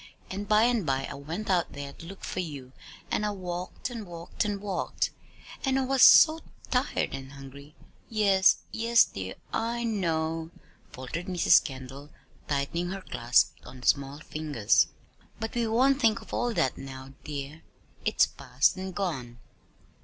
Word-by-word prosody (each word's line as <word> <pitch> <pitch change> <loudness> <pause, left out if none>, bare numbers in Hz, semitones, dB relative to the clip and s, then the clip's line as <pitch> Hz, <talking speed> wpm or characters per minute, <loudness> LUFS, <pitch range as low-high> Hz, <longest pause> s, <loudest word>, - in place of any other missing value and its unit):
And 200 +2 -4
by 215 +1 +5
and 235 -3 +2
by 135 -3 0
I - - -6
went 160 +9 -6
out 180 -3 +1
there 140 -1 -7
to 165 - -12
look 195 +2 -11
for - - -4
you, 145 -7 -6 0.4
and - - +1
I 210 - +1
walked 185 +5 -5
and 225 -4 -6
walked 170 +3 -4
and 205 -1 -2
walked. 195 -2 -2 0.5
And 270 -1 +2
I 270 - +1
was 265 0 +1
so 320 0 +9 0.3
tired 255 +2 0
and 135 0 -7
hungry!" 140 +2 -12 0.3
"Yes, 200 -3 +4
yes, 230 +1 +4
dear, 95 -1 -6 0.2
I 235 +1 -1
know," 165 -7 -1 0.4
faltered 130 +7 -6
Mrs. 180 -2 +5
Kendall, 135 +2 -8 0.4
tightening 150 +5 -1
her 195 +1 -5
clasp 120 +2 +2
on 125 0 -11
the - - -4
small 140 0 +2
fingers. 150 -10 +1 0.5
"But 225 0 -4
we 235 -1 0
won't 265 +5 +3
think 225 -1 +3
of - - -13
all 245 - 0
that 135 - 0
now, 135 0 -9
dear. 145 +1 -6 0.4
It - - 0
is - - +9
past 135 +8 +1
and 190 -1 -5
gone. 130 -12 -3
175 Hz, 165 wpm, -28 LUFS, 140-215 Hz, 0.5 s, so